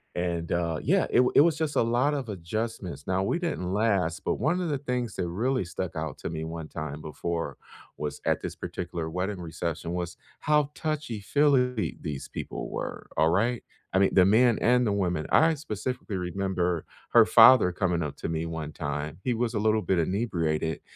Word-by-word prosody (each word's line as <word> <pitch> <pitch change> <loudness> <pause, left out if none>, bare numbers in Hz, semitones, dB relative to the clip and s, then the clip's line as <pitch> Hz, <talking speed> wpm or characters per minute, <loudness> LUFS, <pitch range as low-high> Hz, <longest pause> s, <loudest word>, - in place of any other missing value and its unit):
and, 85 -1 -2
uh, 85 -2 0
yeah, - - +2
it - - +2
w 125 0 +4
it - - +8
was 160 -1 +3
just 155 -2 -2
a - - +5
lot 120 +6 +2
of 135 -4 -3
adjustments. 95 -4 -4
Now, 95 0 +1
we 170 - 0
didn't 130 - -2
last, 100 -4 +1
but - - +1
one 155 +9 0
of 175 - -1
the 145 - 0
things 125 -5 -3
that - - -2
really 125 +8 0
stuck 90 +1 -5
out 80 -3 -4
to - - -4
me 80 -1 -4
one 80 -1 -6
time 75 -2 -6
before 85 +2 -4 0.4
was 75 -1 -4
at - - +1
this - - -4
particular 85 -2 -5
wedding 90 +3 -3
reception 85 0 -4
was 90 -1 -4 0.2
how 150 -1 +2
touchy-feely 135 -3 0
these 75 -5 -5
people - - -5
were, - - -5
alright? 105 +10 +2 0.3
I 95 - +4
mean, 95 - +3
the 90 - +6
men 115 +4 +5
and 125 +1 +4
the - - +1
women. 90 -6 -1
I 160 0 +5
specifically 125 -5 -4
remember 90 -2 -1 0.3
her - - +7
father 130 -8 +7
coming 90 -2 0
up 75 - -5
to - - -4
me 80 0 -2
one 80 -2 -5
time- 75 +2 -4
he 125 - +1
was 120 0 -1
a 105 - 0
little 110 0 +2
bit 95 -3 0
inebriated- 80 -5 -1
95 Hz, 190 wpm, -27 LUFS, 85-120 Hz, 0.4 s, it